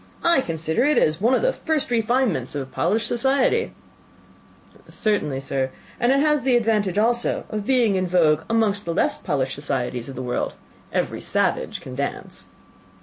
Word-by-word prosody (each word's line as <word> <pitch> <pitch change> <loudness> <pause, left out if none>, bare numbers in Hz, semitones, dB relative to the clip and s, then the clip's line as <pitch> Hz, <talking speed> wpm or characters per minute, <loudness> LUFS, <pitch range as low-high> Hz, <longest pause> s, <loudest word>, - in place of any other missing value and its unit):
I 340 -5 +4
consider 160 +2 -1
it 295 +2 +3
as 155 +3 +2
one 240 +4 +4
of - - 0
the - - +2
first 310 -6 -2
refinements 225 - 0
of 135 -2 -4
polished 215 +7 0
societies." 270 - +1 1.2
"Certainly, 170 -11 -1
sir; 135 -1 -2 0.3
and 240 +2 +3
it 275 +1 +3
has 300 -1 +2
the 255 0 +2
advantage 215 -5 +1
also 235 +3 +1
of 210 -2 -4
being 245 -6 +3
in 185 -1 0
vogue 160 -4 +3
amongst 215 -3 +1
the 170 -1 -2
less - - +1
polished 135 -2 -1
societies 130 -3 -3
of 135 - -8
the 130 - -5
world: 125 -1 -2 0.4
every - - -2
savage - - -1
can 130 - -9
dance." 140 +2 -5
210 Hz, 165 wpm, -23 LUFS, 150-245 Hz, 1.2 s, I